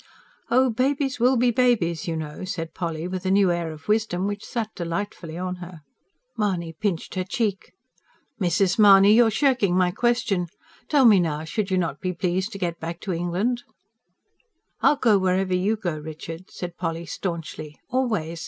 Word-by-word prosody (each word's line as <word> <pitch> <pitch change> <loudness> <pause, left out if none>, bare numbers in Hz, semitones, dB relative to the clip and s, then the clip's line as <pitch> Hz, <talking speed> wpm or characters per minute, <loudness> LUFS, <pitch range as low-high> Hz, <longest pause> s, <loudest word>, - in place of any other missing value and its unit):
"Oh, 255 +1 +4
babies 265 +2 0
will 250 +2 +4
be 245 +1 +3
babies, 220 -11 +1
you 165 - -1
know!" 150 +2 -6
said 165 -3 -5
Polly, 165 -1 -3
with 185 0 -4
a 185 - -1
new 195 -1 +4
air 170 -2 -2
of 155 0 -12
wisdom 210 -4 +1
which 205 +1 -3
sat 225 -3 -4
delightfully 170 -1 -4
on 180 0 -3
her. 175 -2 -10 0.5
Mahony 180 -6 -1
pinched 170 0 -3
her 185 - -1
cheek. 205 -1 -2 0.7
"Mrs. 185 +3 +2
Mahony, 200 -1 +8
you're 230 0 +6
shirking 220 -6 +2
my 180 -1 +3
question. 235 -5 0 0.4
Tell 285 -4 +4
me 210 -5 +7
now, 155 -3 -1
should 195 +5 -2
you 190 - +1
not 165 -5 -2
be 185 -1 -2
pleased 185 +4 -1
to - - -5
get 175 -3 -3
back 170 +1 -5
to 190 - -3
England?" 180 +9 -1 1.2
"I'll - - +5
go 225 -7 +3
wherever 185 0 +1
you 190 +5 +1
go, 175 -8 -3
Richard," 160 +3 -8
said 175 -1 -7
Polly 165 -1 -3
staunchly. 160 -3 -5
"Always. 215 -11 -1
185 Hz, 170 wpm, -24 LUFS, 170-220 Hz, 1.2 s, Mahony